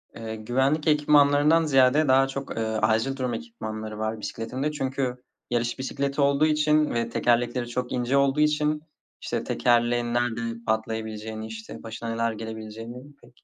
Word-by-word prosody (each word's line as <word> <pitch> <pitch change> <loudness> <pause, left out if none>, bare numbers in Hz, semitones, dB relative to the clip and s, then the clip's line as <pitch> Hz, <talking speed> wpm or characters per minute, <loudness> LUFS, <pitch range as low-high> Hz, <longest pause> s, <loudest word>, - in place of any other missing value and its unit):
Eee, 110 -1 -6
güvenlik 130 +8 0
ekipmanlarından 150 +1 +4
ziyade 135 +1 +4
daha 135 +1 +5
çok, 135 -2 -6
eee, 115 - 0
acil 110 +4 +1
durum 125 -2 -2
ekipmanları 110 - -6
var 110 0 -2
bisikletimde 125 +7 -3
çünkü 130 -3 -3 0.3
yarış 120 +1 -1
bisikleti 140 +2 -2
olduğu 140 +2 +4
için 150 0 +3
ve 115 0 -1
tekerlekleri 120 +1 +1
çok 125 +1 -3
ince 125 +2 +1
olduğu 140 +1 +2
için, 150 0 +2 0.4
işte, - - -3
tekerleğin 120 0 +1
nerede 120 -1 0 0.3
patlayabileceğini, 110 0 -3
işte, 110 +1 -9
başına 115 +1 -6
neler 115 0 0
gelebileceğini 115 +5 -8
pek 120 - -21
125 Hz, 145 wpm, -26 LUFS, 115-140 Hz, 0.4 s, daha